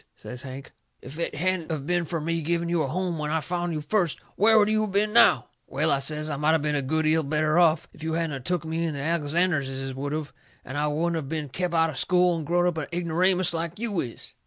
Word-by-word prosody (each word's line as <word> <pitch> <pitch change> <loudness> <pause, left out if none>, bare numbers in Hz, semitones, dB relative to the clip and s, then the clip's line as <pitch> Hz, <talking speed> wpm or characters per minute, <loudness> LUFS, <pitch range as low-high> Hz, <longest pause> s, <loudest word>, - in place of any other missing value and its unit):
says 125 -1 -9
Hank. 135 0 -9 0.3
"If 135 +6 -8
it 170 - -2
hadn't 180 +1 -1
of 150 -4 -3
been 175 +1 0
fur 165 +2 -3
me 165 +2 -1
giving 170 +2 -1
you 170 -1 +1
a 140 - 0
home 175 +2 -2
when 150 0 -2
I 160 +1 +1
found 175 +2 -2
you 155 -2 -3
first, 170 +1 0 0.2
where 220 +2 +5
would 210 -1 +5
you 215 0 +2
of 205 - -6
been 210 +2 +1
now?" 180 - +5 0.2
"Well," 150 +4 0
I 140 - +2
says, 150 +2 -1
"I 150 -2 -3
might 150 +2 +3
of 155 - 0
been 150 -1 0
a 145 - +1
good 160 +4 0
'eal 160 +1 +3
better 155 +2 +1
off. 165 -2 +3
If - - -15
you 160 0 -2
hadn't 165 -2 -1
of 135 - -7
took 175 +1 -1
me 160 +1 -2
in 160 -3 -2
the - - -4
Alexanderses 145 -3 0
would 140 +2 -4
of, 155 -2 -4 0.3
and 130 - -7
then 145 - 0
I - - +1
wouldn't 165 +3 0
of 140 -4 -5
been 155 -3 -3
kep' 175 +6 -2
out 165 -1 +3
of 135 - -5
school 180 -1 +3
and 160 -3 -5
growed 175 +1 +2
up 175 -3 0
a 150 - -4
ignoramus 180 +1 +1
like 165 +1 -3
you 215 -4 -1
is." 120 -6 -5
160 Hz, 270 wpm, -26 LUFS, 150-175 Hz, 0.3 s, where